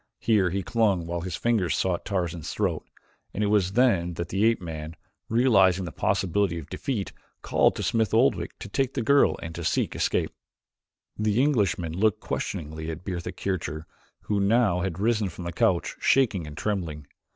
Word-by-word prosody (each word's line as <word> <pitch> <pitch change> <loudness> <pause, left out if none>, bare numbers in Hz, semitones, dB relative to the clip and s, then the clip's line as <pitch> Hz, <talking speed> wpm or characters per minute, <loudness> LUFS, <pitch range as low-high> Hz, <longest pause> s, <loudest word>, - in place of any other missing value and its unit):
Here 105 -6 +2
he 95 +2 -2
clung 100 -4 +1
while 85 0 -3
his 90 -1 -4
fingers 110 -7 +1
sought 90 -2 -1
Tarzan's 85 -5 -2
throat, - - -1 0.5
and 105 - 0
it 105 0 +1
was 95 -3 +2
then 100 -8 +2
that 85 0 -4
the 100 +3 +1
ape 115 0 +3
man, 80 -2 -7 0.3
realizing 100 -6 +4
the 85 - -6
possibility 95 +2 0
of 80 - -9
defeat, 115 -8 -3 0.3
called - - +3
to - - -4
Smith 110 -4 +1
Oldwick 110 -7 +2
to - - -8
take 135 +5 -1
the 125 - -1
girl 140 +4 +4
and 80 0 -7
seek - - 0
to - - -7
escape. - - 0 0.9
The 105 +1 +1
Englishman 100 - +1
looked 105 +3 +2
questioningly 80 0 -4
at 80 +2 -7
Bertha 90 -3 -4
Kircher, 80 -5 -4 0.4
who 105 -1 -1
had 100 - +2
now 105 -5 +3
risen 100 +3 0
from 90 - -9
the 85 0 -5
couch, 85 +1 +1
shaking 105 - +2
and 75 -1 -10
trembling. 85 -8 -3
95 Hz, 175 wpm, -26 LUFS, 85-110 Hz, 0.9 s, realizing